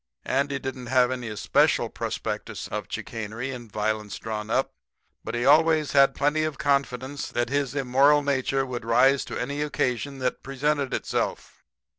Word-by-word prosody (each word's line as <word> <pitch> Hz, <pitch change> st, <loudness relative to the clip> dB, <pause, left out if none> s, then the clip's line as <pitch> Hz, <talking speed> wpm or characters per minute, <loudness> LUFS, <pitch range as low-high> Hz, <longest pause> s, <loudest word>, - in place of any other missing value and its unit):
Andy 140 Hz, +1 st, 0 dB
didn't 130 Hz, -2 st, -6 dB
have 125 Hz, 0 st, +3 dB
any 125 Hz, -2 st, -4 dB
especial 105 Hz, -3 st, +2 dB
prospectus -, -, -4 dB
of -, -, -4 dB
chicanery 115 Hz, +4 st, -5 dB
and 120 Hz, -4 st, -9 dB
violence 105 Hz, 0 st, -2 dB
drawn 110 Hz, -1 st, -5 dB
up, 130 Hz, +4 st, 0 dB, 0.5 s
but 115 Hz, -, -4 dB
he 120 Hz, +1 st, -1 dB
always 155 Hz, +1 st, +4 dB
had 135 Hz, -1 st, +5 dB
plenty 150 Hz, +2 st, +1 dB
of 155 Hz, -3 st, -2 dB
confidence 140 Hz, -2 st, -1 dB
that 120 Hz, 0 st, -1 dB
his 140 Hz, -1 st, -1 dB
immoral 140 Hz, +2 st, +4 dB
nature 135 Hz, -1 st, 0 dB
would 125 Hz, -2 st, -5 dB
rise 130 Hz, +4 st, +4 dB
to -, -, -5 dB
any 140 Hz, +4 st, -3 dB
occasion 140 Hz, -2 st, -1 dB
that 130 Hz, -1 st, -2 dB
presented 140 Hz, 0 st, -1 dB
itself. -, -, -3 dB
135 Hz, 155 wpm, -26 LUFS, 120-140 Hz, 0.5 s, had